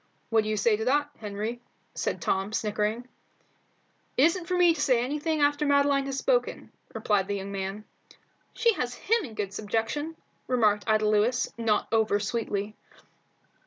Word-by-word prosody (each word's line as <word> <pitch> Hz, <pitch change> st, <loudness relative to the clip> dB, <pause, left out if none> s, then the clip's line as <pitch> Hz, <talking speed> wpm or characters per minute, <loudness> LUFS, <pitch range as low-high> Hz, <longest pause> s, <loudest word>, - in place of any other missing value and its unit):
"What 225 Hz, -1 st, +4 dB
do 215 Hz, -, -3 dB
you 215 Hz, -, 0 dB
say 210 Hz, +2 st, +3 dB
to 220 Hz, -, -3 dB
that, 290 Hz, +3 st, +1 dB
Henry?" 215 Hz, +3 st, -4 dB, 0.3 s
said -, -, -3 dB
Tom, 195 Hz, +2 st, -1 dB
snickering. 215 Hz, +3 st, -1 dB, 1.1 s
"It 260 Hz, -, +5 dB
isn't 335 Hz, +2 st, +2 dB
for 365 Hz, 0 st, 0 dB
me 350 Hz, -2 st, +5 dB
to 310 Hz, -, -4 dB
say 250 Hz, -3 st, +3 dB
anything 300 Hz, +4 st, -1 dB
after 290 Hz, +1 st, +2 dB
Madeline 280 Hz, -1 st, +3 dB
has 275 Hz, -1 st, -3 dB
spoken," -, -, 0 dB, 0.2 s
replied 205 Hz, -3 st, +1 dB
the 205 Hz, -, -1 dB
young 195 Hz, 0 st, -5 dB
man. 195 Hz, +2 st, -4 dB, 0.7 s
"She 465 Hz, -1 st, +3 dB
has 245 Hz, -9 st, -3 dB
him 455 Hz, +1 st, +1 dB
in 230 Hz, -8 st, -8 dB
good 200 Hz, -2 st, -3 dB
subjection," 225 Hz, +10 st, -2 dB, 0.3 s
remarked 215 Hz, -5 st, +2 dB
Ida 215 Hz, -1 st, +3 dB
Lewis, 215 Hz, +4 st, +1 dB
not 225 Hz, -3 st, 0 dB
over 220 Hz, -2 st, +2 dB
sweetly. 210 Hz, -1 st, -3 dB
225 Hz, 160 wpm, -27 LUFS, 210-285 Hz, 1.1 s, It